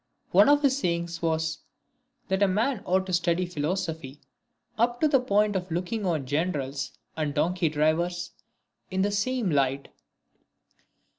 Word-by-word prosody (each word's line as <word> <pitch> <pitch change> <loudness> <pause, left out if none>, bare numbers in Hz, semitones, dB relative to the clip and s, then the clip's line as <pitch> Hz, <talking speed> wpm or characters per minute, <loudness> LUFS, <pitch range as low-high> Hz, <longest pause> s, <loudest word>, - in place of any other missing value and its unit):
One - - +6
of 290 0 +4
his 275 -1 +3
sayings 170 -5 -2
was, 160 -1 -1 0.3
" 260 +1 -47
That 190 +1 0
a 200 - +5
man 215 +4 0
ought 185 +1 +2
to 185 - -5
study 175 +1 +1
philosophy, 160 -3 -3 0.6
up 240 +2 +1
to 310 - +5
the 280 -3 +4
point 210 -4 +2
of 185 -1 -2
looking 185 +5 -2
on 155 -6 0
generals 145 -2 -2 0.2
and 150 -2 -2
donkey 170 +2 +1
drivers 170 +4 0 0.6
in 190 0 0
the 205 - +1
same 215 0 0
light." 140 -1 0
180 Hz, 150 wpm, -27 LUFS, 160-205 Hz, 0.6 s, One